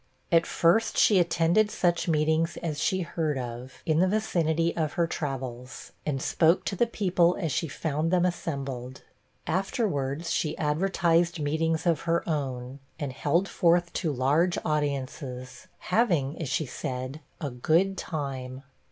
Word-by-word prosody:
At 165 0 +4
first, 220 +7 +2
she 200 -3 +5
attended 175 +5 +3
such 175 -4 0
meetings 160 +1 +1
as 155 -3 -2
she 185 +4 +1
heard 160 -4 -2
of, 125 +1 -7
in 155 0 +2
the 185 - +4
vicinity 170 -5 +1
of 155 -3 -1
her 170 - +2
travels, 130 -5 -5 0.2
and 140 -3 0
spoke 165 +5 +2
to - - -2
the 235 +5 +2
people 180 -5 +2
as 165 -6 -1
she 165 - -1
found 155 +2 -2
them 180 0 +3
assembled. 135 -7 -4 0.4
Afterwards, 170 - -1
she 155 -1 -1
advertised 170 +1 +1
meetings 160 +3 0
of 170 -3 +2
her 170 0 +1
own, 135 -4 -3 0.2
and 140 -4 -3
held 170 +8 +1
forth 175 -1 +2
to 165 -4 0
large 145 +7 +2
audiences, 140 -1 -3 0.3
having, 170 - +2
as 150 - -3
she 155 - 0
said, 130 +3 -5 0.2
'a 145 -5 -3
good 165 +10 +2
time.' 135 -6 -5
160 Hz, 145 wpm, -27 LUFS, 140-175 Hz, 0.4 s, she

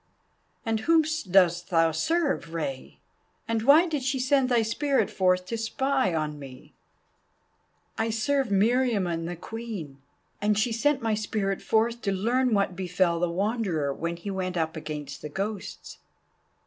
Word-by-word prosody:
"And 225 -1 0
whom 325 +7 +4 0.3
dost 175 -2 +3
thou 165 -2 +3
serve, 275 - -1
Rei? 135 -5 -4 0.5
And 230 -1 0
why 285 +8 +6
did 310 -5 -2
she 265 +1 -1
send 260 0 +2
thy 240 -2 +3
spirit 270 +5 0
forth 185 -1 +2
to 230 +4 -4
spy 265 0 0
on 150 -1 -2
me?" 130 -2 -12 1.3
"I 225 +1 +1
serve 265 +5 0
Meriamun 200 -5 +1
the 175 - -4
Queen, 195 -8 -7 0.4
and 210 0 +2
she 215 +3 +1
sent 270 +3 +1
my 225 -1 +1
spirit 210 -2 -2
forth 230 +2 +1
to 200 - -1
learn 235 +5 +1
what 200 -2 0
befell 180 -2 0
the 175 0 +1
Wanderer 185 - -1
when 170 +4 -3
he 200 +4 -6
went 185 -2 -3
up 160 0 -1
against 150 -2 -6
the 150 - -6
Ghosts." 195 +5 -5
205 Hz, 150 wpm, -27 LUFS, 170-235 Hz, 1.3 s, why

